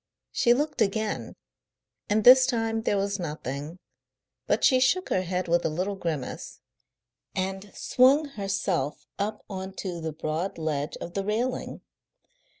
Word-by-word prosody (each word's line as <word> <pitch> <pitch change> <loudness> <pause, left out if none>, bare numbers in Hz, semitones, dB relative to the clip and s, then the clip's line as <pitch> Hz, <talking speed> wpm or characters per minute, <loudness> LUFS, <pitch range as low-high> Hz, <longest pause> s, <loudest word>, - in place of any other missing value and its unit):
She 240 -1 +4
looked 295 -1 -1
again, 215 +1 -1 0.7
and 210 +1 +2
this 255 +2 +9
time 225 -3 0
there 205 - +1
was 200 0 -1
nothing, 150 -1 -5 0.7
but - - +1
she 260 -2 +6
shook 365 +9 +2
her 185 - +2
head 185 0 -2
with 170 0 +2
a - - +1
little 185 +6 -2
grimace, 160 -8 -4 0.8
and 190 +1 -3
swung 280 +4 +4
herself 195 - -2
up 210 +1 -3
on 190 -1 -6
to 180 -4 -5
the 160 0 -3
broad 155 +4 -3
ledge 155 -2 -2
of 175 - -7
the 195 - -1
railing. 230 +5 -2
195 Hz, 145 wpm, -27 LUFS, 170-225 Hz, 0.8 s, this